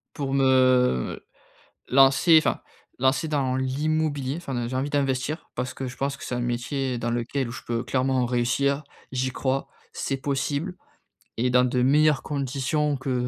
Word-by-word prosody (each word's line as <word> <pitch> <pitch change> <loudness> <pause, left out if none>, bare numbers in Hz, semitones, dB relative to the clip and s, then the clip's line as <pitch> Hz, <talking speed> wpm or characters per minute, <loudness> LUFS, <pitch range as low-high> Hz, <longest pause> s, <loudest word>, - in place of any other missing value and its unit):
pour 140 -2 -3
me, 135 0 +3
heu, 130 - +3 0.6
lancer, 135 +5 +6
enfin - - 0 0.4
lancer 130 +4 +2
dans 135 -4 0
l'immobilier 145 +1 -1
enfin 130 -8 -4
j'ai 130 - -3
envie 135 +3 -1
d'investir 140 +2 -1
parce 125 +1 -3
que 130 -1 -4
je 125 - -9
pense 140 +1 -2
que - - -10
c'est 125 - -4
un - - -2
métier 125 +2 -2
dans 120 +1 -2
lequel 120 +2 -2
je 120 - -8
peux 115 -1 -1
clairement 130 -1 +1
réussir. 135 +4 0 0.3
J'y 130 0 -1
crois. 135 +1 -2 0.2
C'est 135 - -2
possible 140 +6 -2 0.6
et 125 +2 +1
dans 125 0 +4
de 125 0 +1
meilleures 150 +2 +4
conditions 140 +1 -1
que 125 -2 -2
135 Hz, 165 wpm, -25 LUFS, 125-140 Hz, 0.6 s, lancer